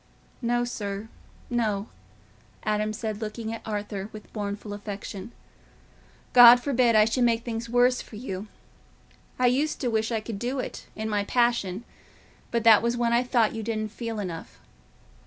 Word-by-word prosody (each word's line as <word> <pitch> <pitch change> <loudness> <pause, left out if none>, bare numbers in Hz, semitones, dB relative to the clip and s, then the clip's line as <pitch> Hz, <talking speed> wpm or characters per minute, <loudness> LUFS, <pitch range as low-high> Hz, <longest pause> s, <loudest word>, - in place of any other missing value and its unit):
"No, 240 0 +1
sir, 210 -2 -5 0.4
no," 215 -4 -1 0.8
Adam 215 0 0
said, 215 0 -4
looking 220 +1 -4
at 230 - -6
Arthur 205 -1 -4
with 215 -1 -12
mournful 205 0 -4
affection. 205 0 -7 1.0
"God 245 0 +10
forbid 245 -3 +2
I 215 0 +7
should 245 +3 +1
make 230 -1 +2
things 230 -1 -4
worse 245 +1 +3
for - - -12
you. 210 -3 -5 0.9
I 255 - +2
used 275 +5 +1
to 250 - 0
wish 220 +1 0
I 225 - +1
could 215 -1 -6
do 250 +4 -2
it, 255 - -5
in 220 0 -3
my 205 -2 0
passion—but 235 0 -2
that 225 -2 +7
was 235 +1 0
when 235 -1 +1
I 240 - +4
thought 240 -3 +2
you 225 - -4
didn't 215 -1 -3
feel 230 -1 -5
enough. 165 - -6
225 Hz, 155 wpm, -26 LUFS, 210-240 Hz, 1.0 s, God